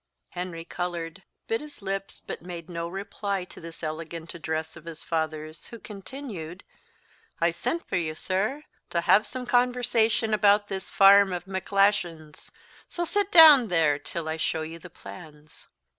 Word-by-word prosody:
Henry 175 -2 -6
coloured, 175 0 -4 0.2
bit 225 - -1
his 300 -1 -10
lips, 195 0 -3
but - - -6
made 175 -1 -8
no 170 0 -3
reply 195 +1 -3
to - - -14
this 165 0 -10
elegant 160 +1 -5
address 160 -1 -4
of 165 -1 -13
his 165 -2 -6
father's, 155 -1 -3
who 235 - -9
continued, 200 - -8 0.8
"I - - +3
sent 335 +1 -3
for - - -1
you, 160 -3 -2
sir, 210 - -1 0.3
to 170 - 0
have 210 +5 +4
some 255 0 -5
conversation 245 -3 +2
about 205 0 +4
this 190 -1 -4
farm 200 0 +7
of 175 -1 -4
Macglashan's; 190 -4 0 0.4
so 345 - -2
sit 405 +3 0
down 310 - +9
there 160 -6 +2
till 155 +3 -5
I 160 0 -2
show 160 0 -1
you 165 +1 -7
the 180 - -11
plans." 155 -3 -13
180 Hz, 160 wpm, -26 LUFS, 165-210 Hz, 0.8 s, down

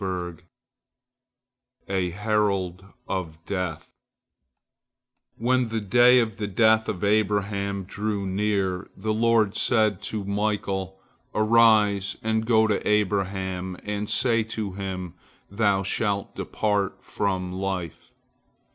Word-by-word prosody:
A 95 -2 0
HERALD 100 -2 -1 0.2
OF 85 -4 -4
DEATH 90 -5 -4 1.5
When 125 +1 +1
the 115 0 -1
day 120 +4 +5
of 115 -3 +1
the 105 - -3
death 110 +2 +3
of 95 0 -4
Abraham 100 -1 0
drew 105 +1 -3
near, 95 -1 -1
the 110 +3 -1
Lord 110 -2 +2
said 110 -5 +2
to 105 -2 -3
Michael, 100 -2 -2 0.4
"Arise 110 -3 +4
and 110 0 0
go 110 -2 +5
to 105 -2 +1
Abraham 95 -3 -1
and 105 0 -3
say 115 -3 +2
to 110 -2 -4
him, 95 -2 -5 0.4
Thou 100 -2 +2
shalt 100 0 -1
depart 105 -2 -1
from 95 -3 -2
life!" 95 -3 -4
100 Hz, 105 wpm, -25 LUFS, 95-110 Hz, 1.5 s, day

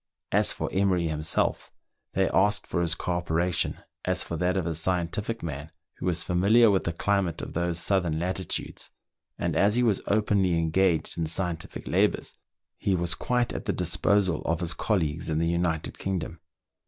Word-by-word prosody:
As - - +3
for - - -3
Emery 95 -3 +2
himself, 75 0 0 0.4
they - - +2
asked 105 +3 +2
for 85 - -1
his 85 -1 +1
co 90 - -3
operation 85 0 0 0.2
as 90 0 +1
for 85 - -5
that 90 +3 0
of 90 - -1
a 85 - -1
scientific 90 +7 -2
man 75 -1 -5 0.3
who - - -4
was 90 -1 +1
familiar 105 +6 +4
with 95 - +1
the 85 - 0
climate 95 -1 0
of - - -6
those 85 0 -1
southern 90 -5 +1
latitudes, 90 +3 -3 0.5
and - - -1
as 105 +2 +3
he 125 - +3
was 110 -5 +2
openly 100 -4 +2
engaged 85 0 +1
in 80 - 0
scientific 85 0 -4
labours, - - +1 0.5
he 95 - +1
was 85 -1 +1
quite 125 +7 0
at - - -5
the - - 0
disposal 90 0 +1
of 85 +1 0
his 85 0 0
colleagues 80 -7 -1
in 80 - 0
the 85 - +1
United 85 -1 -1
Kingdom. 90 -3 -3
90 Hz, 175 wpm, -27 LUFS, 85-95 Hz, 0.5 s, familiar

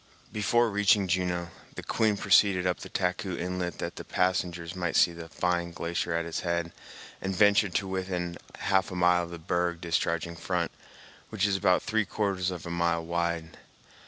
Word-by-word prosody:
Before 115 +2 +2
reaching 105 -1 +3
Juneau, 90 -1 0 0.3
the - - -6
Queen 110 -3 +1
proceeded 95 -2 +4
up 90 -1 0
the - - -9
Taku 90 0 -1
Inlet 90 -1 -3
that - - -5
the - - -6
passengers 90 -2 -1
might 90 -2 -2
see 85 - +5
the 85 -1 -9
fine 85 0 0
glacier 85 0 -2
at 85 0 -1
its 85 - -3
head, 85 -1 -1 0.5
and 95 0 -2
ventured 100 -1 +4
to 100 - +1
within 90 -2 -3 0.2
half 95 -1 +1
a 90 - -6
mile 90 0 +4
of - - -11
the 85 - -7
berg 85 +1 -1
discharging 85 0 -1
front, 90 0 -2 0.6
which 105 -2 0
is 100 -1 +2
about 90 -1 +3
three 110 -1 +1
quarters 95 -2 -1
of 90 -3 -6
a 85 - -5
mile 85 -1 0
wide. 85 -1 -2
90 Hz, 180 wpm, -28 LUFS, 85-95 Hz, 0.6 s, see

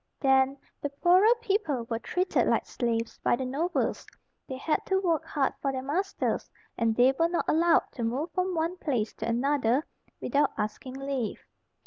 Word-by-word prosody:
Then, 270 0 +3 0.2
the 285 - -2
poorer 365 +10 +4
people 390 - 0
were 230 -1 -2
treated 365 +9 0
like - - +2
slaves 230 -2 -2
by - - +2
the 260 - -4
nobles; 310 +8 -1 0.4
they 260 - -5
had 305 +4 0
to 380 0 +2
work 335 -5 +1
hard 275 -2 0
for 275 - 0
their 260 -1 -4
masters, 355 +9 -1 0.3
and 225 -1 +1
they 250 +3 +5
were 330 0 +3
not 345 - -1
allowed 335 +1 +4
to 240 - -5
move 260 +9 -2
from 365 -1 -1
one 335 +3 -1
place 245 -11 -1
to 220 - -4
another 255 +2 +1 0.3
without 285 0 +1
asking 215 +5 -4
leave. 270 -4 -3
275 Hz, 170 wpm, -28 LUFS, 250-340 Hz, 0.4 s, they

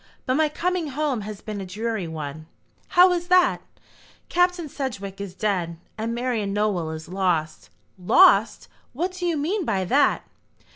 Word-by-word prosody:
But 255 - +1
my 310 +2 +2
coming 355 +2 -1
home 285 -4 -1
has 210 0 -7
been 210 -2 -6
a - - -5
dreary 215 -1 -3
one." 155 -1 -7 0.4
"How 365 0 +6
is 350 -1 -1
that?" 360 0 +4 0.7
"Captain 355 -1 +1
Sedgewick 200 -9 -5
is 190 -2 -7
dead, 180 -5 -1 0.2
and 225 +2 -3
Marian 235 -5 -1
Nowell 205 -6 0
is 160 0 -7
lost." 160 - -1 0.3
"Lost! 355 - +4 0.3
What 345 +8 -2
do 365 -1 -4
you 335 -2 0
mean 360 +8 -1
by 190 - -1
that?" 280 +9 +2
225 Hz, 155 wpm, -24 LUFS, -, 0.7 s, How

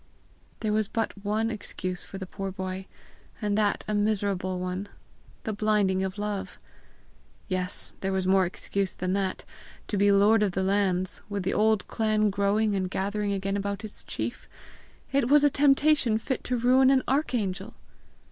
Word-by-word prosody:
There 215 -2 0
was 215 -1 +1
but 225 +2 -1
one 215 +2 0
excuse 185 -4 -4
for 195 - -8
the 190 - -5
poor 195 +1 -5
boy 185 0 -5 0.5
and 210 -2 0
that 210 -1 +1
a 215 - -1
miserable 200 -3 0
one: 185 +2 -4 0.5
the 220 - -2
blinding 205 -3 +2
of 190 +1 -3
love! 205 -2 -4 0.9
Yes 185 -1 -2
there 195 - -1
was 190 -1 0
more 190 -1 +4
excuse 195 +1 -2
than 185 0 -2
that: 195 -1 -1 0.4
to 205 - -2
be 200 +1 +4
lord 205 +2 +5
of 200 -3 +1
the 190 - 0
old 190 - 0
lands, 185 -2 0
with 200 -2 -2
the 190 - 0
old 215 -1 +2
clan 215 -1 +1
growing 205 +2 +1
and 185 -1 -1
gathering 205 +2 -1
again 195 0 -1
about 200 +1 -3
its 210 - -7
chief! - - -5 0.6
It 270 -3 +2
was 295 +1 +6
a 290 - +5
temptation 280 -4 +4
fit 260 +4 -3
to 250 - 0
ruin 255 +2 +5
an 270 -1 +4
archangel! 245 -9 -1
205 Hz, 170 wpm, -27 LUFS, 190-220 Hz, 0.9 s, was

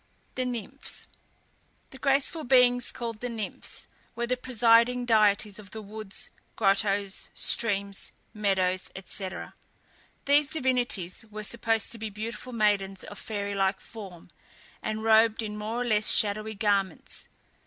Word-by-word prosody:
THE 255 - -2
NYMPHS. 250 +2 -4 0.8
The 265 - -11
graceful 280 +4 +2
beings 245 -2 +4
called 230 -3 -5
the 245 - -3
Nymphs 225 -3 -6 0.3
were 235 +1 -1
the 250 +1 0
presiding 245 0 +3
deities 210 -2 +3
of 200 -2 -12
the 220 +1 -7
woods, 210 -1 -8 0.2
grottoes, 200 -1 +1
streams, 200 -3 +1 0.2
meadows, 190 -3 0 0.2
&c. 190 -2 -5 1.0
These 285 0 +4
divinities 245 - -1
were 215 0 -6
supposed 225 0 +1
to 230 - -4
be 220 0 -4
beautiful 225 +4 -6
maidens 205 -4 +1
of 205 - -8
fairy 205 -2 -3
like 195 -1 +1
form, 190 -6 -11 0.5
and 215 0 -3
robed 225 0 +5
in 210 -1 -4
more 215 +3 -3
or - - -4
less 215 -2 +3
shadowy 215 +1 +2
garments. 200 -4 -1
215 Hz, 130 wpm, -28 LUFS, 200-240 Hz, 1.0 s, robed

